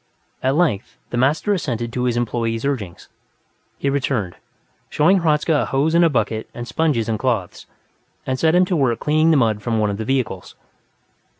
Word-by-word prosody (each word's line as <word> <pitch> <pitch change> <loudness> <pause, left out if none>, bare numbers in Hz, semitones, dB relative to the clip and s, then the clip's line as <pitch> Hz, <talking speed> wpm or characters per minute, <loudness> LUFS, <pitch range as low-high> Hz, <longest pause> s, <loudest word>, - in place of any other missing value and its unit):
At 130 +2 +1
length, 135 - 0
the 120 - -2
master 145 - +2
assented 120 - -3
to 125 0 -1
his 120 -1 0
employee's 115 0 -2
urgings; 110 -11 -4 0.7
he - - -3
returned, 130 -9 -1 0.5
showed 185 +6 +3
Hradzka 160 -1 +1
a - - -1
hose 145 +4 0
and 170 +1 +5
a 165 - +5
bucket 110 -4 -1
and 120 0 -6
sponges 145 -9 0
and 110 -2 -1
cloths, 115 -8 -2 0.6
and 130 0 -2
set 160 +1 +3
him 180 +1 +5
to 180 - -1
work 130 -7 +1
cleaning 155 +2 +2
the 160 - +4
mud 110 -5 +1
from 115 -1 -1
one 105 -1 +1
of 100 - -4
the 110 - -4
vehicles. 120 -8 -2
130 Hz, 185 wpm, -20 LUFS, 115-155 Hz, 0.7 s, and